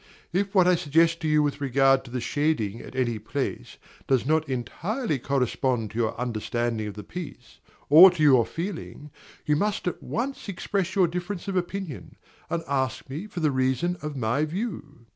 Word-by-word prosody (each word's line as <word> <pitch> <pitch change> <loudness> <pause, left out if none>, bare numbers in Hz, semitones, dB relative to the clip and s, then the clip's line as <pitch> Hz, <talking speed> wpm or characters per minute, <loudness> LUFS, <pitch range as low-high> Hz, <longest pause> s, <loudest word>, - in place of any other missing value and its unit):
If 195 +3 0
what 185 -2 +6
I 180 - +6
suggest 165 +1 +2
to 160 - -1
you 155 -1 +4
with 145 0 -2
regard 135 0 +3
to - - -10
the 125 +1 -3
shading 120 -8 -1
at - - -11
any 120 -4 0
place 120 - -4 0.3
does 130 -3 +2
not 155 +1 +1
entirely 155 - -2
correspond 125 -4 0
to 110 - -8
your 110 0 -1
understanding 120 -1 -2
of 105 - -7
the 105 - -7
piece, 150 - -9 0.3
or 165 +6 +10
to 175 -4 -2
your 130 -5 +6
feeling, 165 -4 -6 0.3
you 150 - +2
must 205 +4 -1
at 180 - -3
once 255 -1 -4
express 195 0 -2
your 185 -3 +4
difference 180 +3 -5
of 195 - -2
opinion, 180 -3 -4 0.3
and 170 -1 -2
ask 130 -1 -2
me 160 +10 -5
for 180 -4 -6
the 155 -2 +2
reason 130 +6 0
of 150 -2 -5
my 125 +4 +1
view. 155 - -5
150 Hz, 180 wpm, -26 LUFS, 130-175 Hz, 0.3 s, or